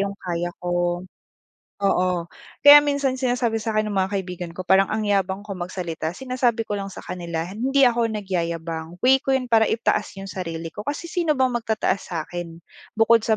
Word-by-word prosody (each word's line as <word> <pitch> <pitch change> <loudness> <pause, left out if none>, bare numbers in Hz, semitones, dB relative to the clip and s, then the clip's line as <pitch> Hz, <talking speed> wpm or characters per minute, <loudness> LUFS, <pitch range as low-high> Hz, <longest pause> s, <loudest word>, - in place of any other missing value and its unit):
'yong 200 0 -2
kaya 175 -2 -3 0.2
ko 175 0 0 0.7
oo. 185 -3 +1 0.4
Kaya 290 0 +11
minsan 280 -3 0
sinasabi 245 -3 0
sa'kin 215 -1 0
ng - - -3
mga 190 +1 +1
kaibigan 180 -2 -5
ko, 185 - -5
parang 190 +2 +4
ang 215 0 -1
yabang 195 -1 0
ko 205 - -6
magsalita, 175 -3 -4
sinasabi 250 -2 0
ko 210 - -6
lang 195 - -4
sa 195 - -10
kanila, 170 -2 -4
"Hindi 260 +9 +2
ako 235 -1 +3
nagyayabang, 170 -4 -3
way 265 +1 +6
ko 270 -1 +1
'yon 260 - -2
para 220 -1 +5
itaas 220 -2 0
'yong 195 0 -7
sarili 165 -3 -5
ko" 210 - -7
kasi 290 +4 -3
sino 335 -5 +1
bang 260 -1 +2
magtataas 225 -4 0
sa'kin? 170 0 -5 0.3
Bukod 225 +1 +5
sa 220 - +3
195 Hz, 180 wpm, -23 LUFS, 175-235 Hz, 0.7 s, Kaya